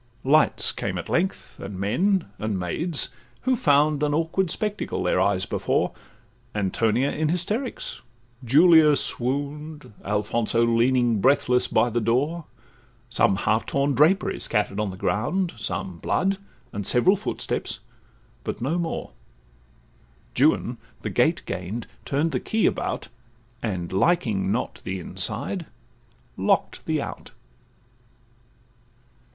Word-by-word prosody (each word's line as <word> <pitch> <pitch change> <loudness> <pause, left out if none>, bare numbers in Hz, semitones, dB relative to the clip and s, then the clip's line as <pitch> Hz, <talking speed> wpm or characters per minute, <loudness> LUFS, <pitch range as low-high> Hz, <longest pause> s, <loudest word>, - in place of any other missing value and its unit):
Lights 150 +4 +4
came - - -3
at - - -6
length, 190 +3 -1
and 95 -1 -7
men, 175 - +1
and 105 -3 -2
maids, 145 - 0 0.3
who 260 0 +2
found 150 - +3
An 150 -1 +1
awkward 165 +3 0
spectacle 210 +4 -2
their - - +2
eyes 95 -2 +2
before; - - 0 0.6
Antonia 110 +6 +1
in 155 0 -1
hysterics, 210 - -3 0.4
Julia 155 +3 +6
swoon'd, 145 +3 -2
Alfonso 110 +3 +1
leaning, 120 -1 +2
breathless, 125 -1 +3
by 120 - +2
the 120 +1 0
door; 145 +9 0 0.7
Some 100 - +3
half 105 +3 0
torn 140 +1 +1
drapery 180 +9 +3
scatter'd 105 -1 -1
on 105 -1 0
the 95 - -8
ground, 170 - 0
Some 190 - -4
blood, 195 +1 0 0.3
and 100 - -3
several 180 +11 +4
footsteps, 205 - -3 0.7
but - - -4
no 145 +9 -1
more: 165 -1 -3 1.2
Juan - - +2 0.2
the - - -4
gate - - +2
gain'd, 100 +6 -4 0.2
turn'd 150 +4 0
the - - 0
key 220 0 0
about, - - -1 0.5
And 90 -6 -3
liking 110 - +2
not - - -2
the 95 0 -3
inside, 110 - -3 0.7
lock'd - - 0
the - - 0
out. - - -8
140 Hz, 120 wpm, -24 LUFS, 105-165 Hz, 1.2 s, Julia